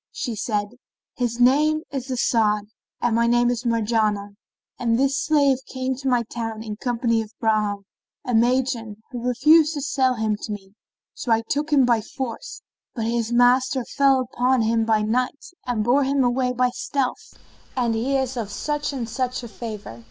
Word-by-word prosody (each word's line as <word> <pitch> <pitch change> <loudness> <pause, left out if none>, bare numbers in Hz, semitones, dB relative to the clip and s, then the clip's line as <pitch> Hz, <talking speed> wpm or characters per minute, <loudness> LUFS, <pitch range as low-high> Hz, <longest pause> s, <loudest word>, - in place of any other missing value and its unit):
Said 235 -5 -4 0.3
she, 245 - -20 0.4
"His 240 -1 -2
name 300 +5 +4
is 270 -2 -4
As'ad 220 -4 +2 0.4
and 240 -2 +1
my 235 0 +3
name 240 +1 +3
is 245 0 -3
Marjanah, 215 -3 +1 0.5
and 230 -1 +1
this 270 +1 +2
slave 280 -4 +3
came 260 0 -2
to 270 +1 -5
my 245 -2 +2
town 225 -1 -5
in 215 -2 -5
company 235 -1 0
of 220 - -7
Bahram, 210 -3 0 0.4
a 250 - -2
Magian, 240 -1 +1 0.2
who 245 -2 -5
refused 305 +6 +4
to 290 - -3
sell 260 -2 +1
him 220 -2 -1
to - - -5
me; 195 -2 -8 0.4
so 245 - -4
I 225 0 +3
took 300 +2 -1
him 275 -3 +5
by 235 -2 +3
force, 255 - -6 0.3
but 225 -3 -2
his 230 0 -1
master 250 +1 +3
fell 275 -2 +3
upon 250 0 +1
him 225 0 +1
by 220 -1 +2
night 250 +5 -1 0.2
and 235 -4 0
bore 255 +5 +3
him 270 0 +1
away 250 +1 +1
by 250 0 +1
stealth 280 - -3 0.4
and 240 -2 +1
he 255 +5 0
is 265 -1 -2
of 220 -4 -3
such 295 +7 -2
and 255 -5 -4
such 250 +1 -3
a - - -6
favour." 210 - -8
245 Hz, 180 wpm, -23 LUFS, 225-265 Hz, 0.5 s, him